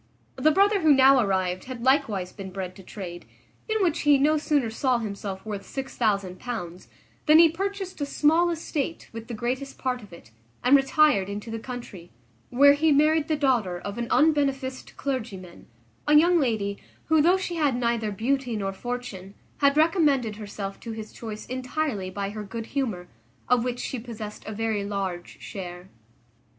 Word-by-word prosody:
The 310 - +3
brother 400 +5 +4
who 315 -2 +5
now 265 0 +6
arrived 185 -4 0
had 250 -2 -7
likewise 230 -9 +1
been 195 -2 -7
bred 185 -1 -6
to - - -11
trade, 180 -2 -8 0.4
in 440 -2 +1
which 340 -2 +1
he 295 -1 +5
no 295 +3 +3
sooner 295 -6 +1
saw 255 +2 +1
himself 200 -3 -5
worth 205 -2 -4
£6000 200 -6 -3 0.4
than 305 +1 +8
he 330 0 +8
purchased 385 0 -4
a - - +1
small 325 +5 +3
estate 325 -2 -3
with 225 0 -8
the 235 - -5
greatest 255 +5 -3
part 250 -1 -2
of 205 - -14
it, 170 -10 -14 0.3
and 250 +3 +6
retired 270 -7 +4
into 205 +3 -6
the 225 - -4
country; 220 -8 -8 0.4
where 280 +3 +6
he 310 +2 +2
married 305 +2 +3
the 315 - +1
daughter 245 -11 +1
of 200 +5 -6
an 235 - -2
unbeneficed 275 -4 +1
clergyman; 220 -10 -5 0.4
a 300 - +5
young 340 +3 +6
lady, 215 -7 -1 0.3
who, 315 -1 +4
though 350 +5 +4
she 365 -2 -4
had 290 -5 +2
neither 235 -3 0
beauty 245 +3 -1
nor 195 -2 -2
fortune, 205 -4 -6 0.2
had 280 0 +3
recommended 295 - +3
herself 200 -2 -6
to 230 - -6
his 220 -1 -8
choice 215 -2 -7
entirely 255 -5 -3
by 200 +1 -4
her 215 0 -6
good 220 +3 -6
humour, 225 -10 -3 0.4
of 245 -1 +3
which 245 -1 -2
she 255 - -4
possessed 220 -3 -8
a - - -4
very 220 -1 -1
large 195 -3 -4
share. 180 -2 -8
245 Hz, 170 wpm, -26 LUFS, 200-290 Hz, 0.4 s, than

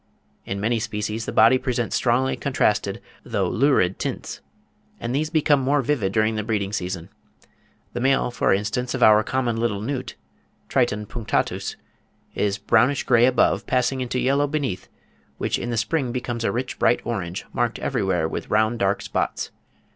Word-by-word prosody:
In 100 - -3
many 115 +3 +1
species 110 0 -3
the - - -2
body 115 +4 +5
presents 120 -3 -1
strongly 130 +2 +2
contrasted, - - 0 0.2
though - - -1
lurid 120 -8 +2
tints, - - -4 0.6
and 120 +1 -3
these 150 +3 0
become 155 -3 +3
more 140 +2 +2
vivid 115 -8 0
during 110 +1 +2
the 105 - -1
breeding 105 -2 -2
season. 90 -2 -4 0.8
The 120 - -3
male, 135 0 +2
for 120 - +1
instance, 105 +6 0
of 125 - +1
our 110 0 +7
common 125 -3 -1
little 115 -3 0
newt 130 +3 -4 0.5
(Triton 120 -5 +1
punctatus) 115 +1 -2 0.6
is 100 -1 0
"brownish 125 +5 +2
grey 120 -1 +5
above, 130 - +2
passing 130 +1 +1
into 125 0 -2
yellow 140 +3 +2
beneath, 135 -11 -3 0.5
which - - -1
in 120 - -4
the 120 - -2
spring 130 +2 0
becomes 120 -2 -3
a - - +1
rich 125 +1 -4
bright 120 - +3
orange, 95 -6 -4
marked - - 0
everywhere 90 -4 0
with - - -5
round 110 +2 +2
dark 100 -1 +1
spots." - - -2
120 Hz, 160 wpm, -23 LUFS, 105-130 Hz, 0.8 s, our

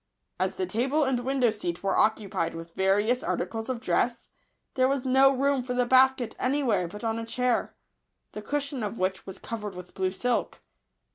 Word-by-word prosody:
As - - 0
the 375 - -1
table 270 +3 +1
and 265 -3 +1
window 255 -1 +1
seat 175 -5 -4
were 195 - +1
occupied 200 -6 +1
with 165 0 -9
various 205 +7 +2
articles 225 -7 -3
of 255 -2 -2
dress, 235 0 0 0.4
there 255 0 +3
was 275 -1 -1
no 265 +1 +5
room 275 0 +1
for 250 0 -4
the 250 0 +2
basket 260 -1 +3
any 280 +3 +1
where 200 -8 +1
but 210 +6 -10
on 225 0 -1
a - - -4
chair, 250 +1 -1 0.6
the 210 - -7
cushion 280 +2 -3
of 210 +1 -3
which 185 +1 -2
was 190 - -6
covered 210 -4 -6
with 180 0 -10
blue 190 -1 0
silk. 240 +6 -2
240 Hz, 190 wpm, -27 LUFS, 205-260 Hz, 0.6 s, no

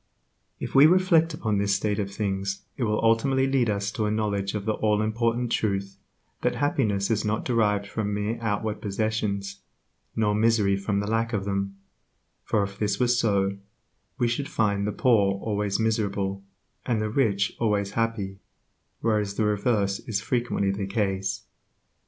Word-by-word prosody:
If - - -5
we 140 +3 +8
reflect 170 -2 +4
upon 110 -8 -1
this 100 0 +2
state 105 +1 -1
of 100 -1 -2
things 100 -1 -2
it 125 - -1
will 105 -1 0
ultimately 130 +4 +3
lead 135 -4 +2
us 100 0 -1
to 110 -2 -1
a - - 0
knowledge 105 -2 -1
of 105 -1 -3
the 110 - +1
all 105 -1 +1
important 115 +2 0
truth 100 -2 -1 0.4
that - - +1
happiness 105 -8 0
is 110 -1 +1
not 110 0 -1
derived 105 -4 +1
from 105 +1 -3
mere 105 +3 -2
outward 105 -1 -2
possessions, 100 -1 -2 0.5
nor 105 -2 +2
misery 105 -2 +3
from 100 +1 -1
the - - -3
lack 115 +1 0
of 100 -2 -1
them; 100 0 -2 0.7
for 105 - +1
if 100 0 -6
this 105 -1 0
were 125 - +3
so, 100 -5 +1 0.6
we 120 - +2
should 130 +4 -2
find 100 -2 +1
the - - 0
poor 105 -5 +3
always 105 -1 -1
miserable, 100 -3 -1 0.4
and 120 -3 0
the 110 0 -2
rich 105 -6 +1
always 105 -3 +1
happy, 105 -4 -2 0.6
whereas 105 -3 0
the 110 - +1
reverse 105 -1 +1
is 105 -3 0
frequently 120 -4 0
the 100 0 -3
case. 95 -2 -1
105 Hz, 165 wpm, -26 LUFS, 100-115 Hz, 0.7 s, we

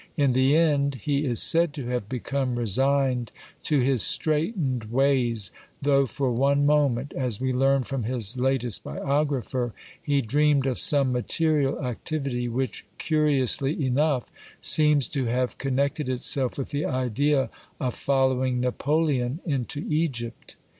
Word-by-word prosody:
In 140 -4 +2
the 130 +4 +3
end 145 -4 +2
he 145 0 0
is 120 -4 +3
said 165 -2 +4
to 140 -5 -6
have 125 -5 -3
become 130 0 -2
resigned 125 +2 +1 0.3
to 150 -4 +1
his 130 -2 +2
straitened 155 - +1
ways, 120 -4 0 0.3
though 140 -1 +2
for 130 +3 -2
one 140 +4 +2
moment, 145 -3 +1
as 125 -6 -2
we 130 0 -1
learn 135 +1 +2
from 135 0 -4
his 120 -2 -2
latest 125 -3 0
biographer, 130 - -2 0.3
he 145 -4 0
dreamed 145 +3 +2
of 130 -2 -1
some 140 -3 +3
material 145 +3 0
activity, 125 0 -3
which, 125 -1 -3
curiously 145 -1 +1
enough, 130 -2 0 0.3
seems 150 -3 +4
to 135 -4 -2
have 125 +1 -2
con, 135 -1 -2
nected 140 +1 -1
itself 130 0 +1
with 135 - -5
the 145 +1 -2
idea 130 +1 0 0.3
of 125 -2 -2
following 130 -2 0
Napoleon 135 +1 0
into 145 -2 -3
Egypt. 135 -8 -3
135 Hz, 140 wpm, -25 LUFS, 125-145 Hz, 0.3 s, said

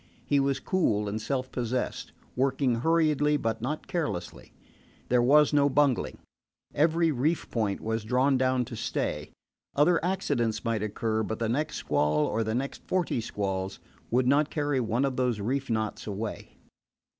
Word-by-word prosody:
He 140 - +2
was 135 0 +1
cool 110 - +1
and 105 +2 -3
self 130 +2 -2
possessed, 125 0 -3 0.2
working 130 -1 +1
hurriedly 150 -2 +3
but 115 -5 -2
not 150 +6 -3
carelessly. 105 - -4 0.6
There 125 -1 +4
was 150 +4 +5
no 145 -1 +4
bungling. 140 -2 +1 0.6
Every 165 +2 +3
reef 150 +5 -1
point 105 -4 0
was 110 0 -2
drawn 130 +5 +2
down 130 -1 +2
to - - -8
stay. - - -2 0.5
Other 165 +4 +3
accidents 135 - -1
might 115 -2 0
occur, 110 +1 -1
but 110 0 -3
the 115 -1 -1
next 150 +6 -1
squall, 75 0 +1
or 115 +1 0
the 110 +1 -2
next 135 +3 -3
forty 175 -10 0
squalls, 95 -3 -3 0.3
would 125 +2 +2
not 145 +3 +3
carry 145 -3 0
one 120 +3 +1
of 135 -2 -2
those 125 -4 +1
reef 130 +6 -2
knots 110 -1 -2
away. 105 +1 -5
125 Hz, 155 wpm, -28 LUFS, 110-145 Hz, 0.6 s, was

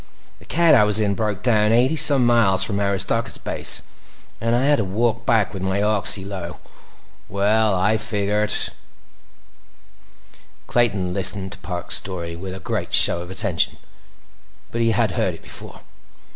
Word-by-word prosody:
The - - -18
cat 170 0 +2
I 105 - +5
was 105 0 +4
in 105 -2 0
broke 105 -2 -4
down 110 -3 +1
eighty 125 +6 +2
some 140 -4 +5
miles 110 -6 +2
from 100 -1 -2
Aristarchus 100 +3 -2
Base - - +1 0.6
and 115 +1 0
I 125 +3 0
had 145 0 +3
to - - -1
walk 115 +4 -2
back—with 105 -4 0
my 95 +1 -2
oxy 105 -2 +3
low. 95 -3 -8 0.7
Well, 105 +1 0
I 100 +4 +1
figured—" 105 -1 -1 2.1
Clayton 100 -7 -1
listened 95 0 +1
to 100 - -9
Parks' 90 -1 -1
story 85 -3 -6
with 95 +2 -8
a - - -9
great 110 -6 -3
show 85 - +7
of 90 - -10
attention, 95 -3 0 0.9
but 115 - -3
he 115 - +1
had 110 - 0
heard - - -2
it - - -18
before. - - -9
105 Hz, 155 wpm, -20 LUFS, 95-115 Hz, 2.1 s, show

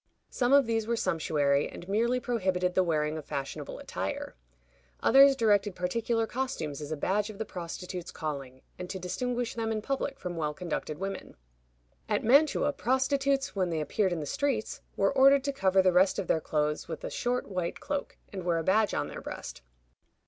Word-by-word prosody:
Some 245 0 +1
of 280 -1 +6
these 225 -1 -1
were 235 - +1
sumptuary, 145 -7 +1
and 175 - -10
merely 235 +5 +1
prohibited 185 -7 0
the 185 - +3
wearing 155 -2 0
of 150 - -10
fashionable 135 -1 -5
attire. - - -4 0.7
Others 275 0 +7
directed 205 -5 +2
particular 225 +5 0
costumes 220 - -3
as 150 +1 -6
a 155 - -2
badge 205 +7 0
of 215 - -9
the 220 - -3
prostitute's 180 0 -6
calling, 135 -4 -6 0.2
and 180 0 -6
to 190 - -4
distinguish 240 +6 -2
them 225 -1 -2
in 220 - -1
public 275 +1 -2
from 180 -1 -5
well 150 -2 -2
conducted 160 -3 -4
women. 195 +3 -5 0.7
At - - +1
Mantua, 285 +4 +4
prostitutes, 270 +1 +1
when 185 -2 +1
they 165 -2 -1
appeared 190 +5 0
in 170 -2 -2
the - - -4
streets, 255 - -1 0.2
were 195 +6 +2
ordered 275 0 +6
to 280 0 -1
cover 190 -6 +3
the 185 -1 +4
rest 185 +2 +4
of 195 - -1
their 160 - +1
clothes 150 -1 -1
with 160 -1 -6
a - - -4
short 250 +1 -1
white 180 -3 -3
cloak, 285 -1 -4 0.2
and 190 -2 -5
wear 170 -1 +1
a 165 - -1
badge 210 +4 +2
on - - -1
their - - -7
breast. - - -7
195 Hz, 190 wpm, -29 LUFS, 170-245 Hz, 0.7 s, Others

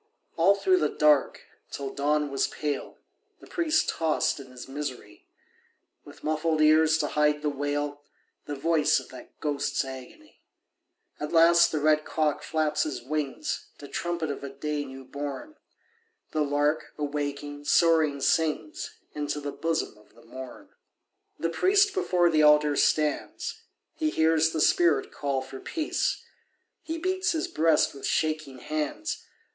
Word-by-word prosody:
All 190 +4 +5
through 370 - +3
the - - +1
dark, 150 -3 +2 0.3
till 140 -1 -5
dawn 150 0 0
was 135 - +1
pale, 145 -2 -4 0.4
The - - -14
priest 320 -2 +1
tossed 160 -2 0
in 135 - -10
his 125 -1 -10
misery, 130 -7 -7 0.8
With - - -15
muffled 155 +1 0
ears 155 +1 +5
to 150 -2 -1
hide 150 0 +1
the 150 - +1
wail, 145 +1 -3 0.5
The 145 - -3
voice 155 +2 +2
of - - -12
that - - -13
ghost's 145 -2 -1
agony. 130 -1 -11 0.8
At 150 - -4
last 170 +1 +6
the 155 - -1
red 155 +1 +3
cock 155 -2 0
flaps 155 -1 0
his 130 -6 -3
wings 150 +1 -3
To 145 - -10
trumpet 170 0 -2
of 140 - -7
a 140 - -5
day 145 +1 -3
new 135 -1 -10
born. 145 - -6 0.8
The 155 - 0
lark, 145 +1 0
awaking, 145 0 -4
soaring 155 -4 +3
sings 155 +1 0 0.2
Into 150 0 -3
the 145 0 -4
bosom 165 -7 -2
of 105 - -24
the 115 - -18
morn. 130 -1 -10 0.7
The 165 - -1
priest 395 - +3
before 180 - +2
the 155 -1 +3
altar 150 -1 +5
stands, 150 +1 0 0.3
He 315 -1 -1
hears 160 - +3
the 160 -1 -2
spirit 170 -1 +3
call 140 -2 -2
for 130 0 -9
peace; 315 -2 -2 0.6
He 325 0 -4
beats 370 +2 0
his 320 - -1
breast 160 0 +2
with 140 - -5
shaking 155 -4 -1
hands. 155 - -4
150 Hz, 150 wpm, -27 LUFS, 145-160 Hz, 0.8 s, last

